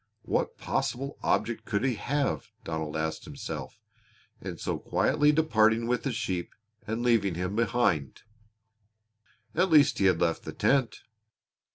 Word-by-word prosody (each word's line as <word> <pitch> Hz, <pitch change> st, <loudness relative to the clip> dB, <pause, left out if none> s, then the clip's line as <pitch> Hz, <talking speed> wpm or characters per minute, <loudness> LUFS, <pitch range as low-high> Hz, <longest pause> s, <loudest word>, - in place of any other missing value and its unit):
What -, -, -1 dB
possible 135 Hz, +3 st, -2 dB
object 115 Hz, +2 st, 0 dB
could 105 Hz, +1 st, -1 dB
he 130 Hz, -, +2 dB
have, 135 Hz, +6 st, -1 dB, 0.2 s
Donald 80 Hz, -2 st, -3 dB
asked 80 Hz, 0 st, -3 dB
himself, -, -, -7 dB, 0.6 s
in -, -, -6 dB
so -, -, -3 dB
quietly 150 Hz, 0 st, +2 dB
departing 115 Hz, -7 st, +3 dB
with 125 Hz, +1 st, 0 dB
the 135 Hz, -, -2 dB
sheep 95 Hz, -7 st, -3 dB, 0.3 s
and 110 Hz, +2 st, -2 dB
leaving 110 Hz, -7 st, +2 dB
him 90 Hz, +3 st, -3 dB
behind? 115 Hz, -, 0 dB, 1.3 s
At 190 Hz, -, +2 dB
least 150 Hz, -4 st, +5 dB
he 100 Hz, -, +3 dB
had 90 Hz, -3 st, +4 dB
left 85 Hz, -1 st, +1 dB
the -, -, -6 dB
tent. 130 Hz, -5 st, +1 dB
115 Hz, 140 wpm, -28 LUFS, 90-130 Hz, 1.3 s, least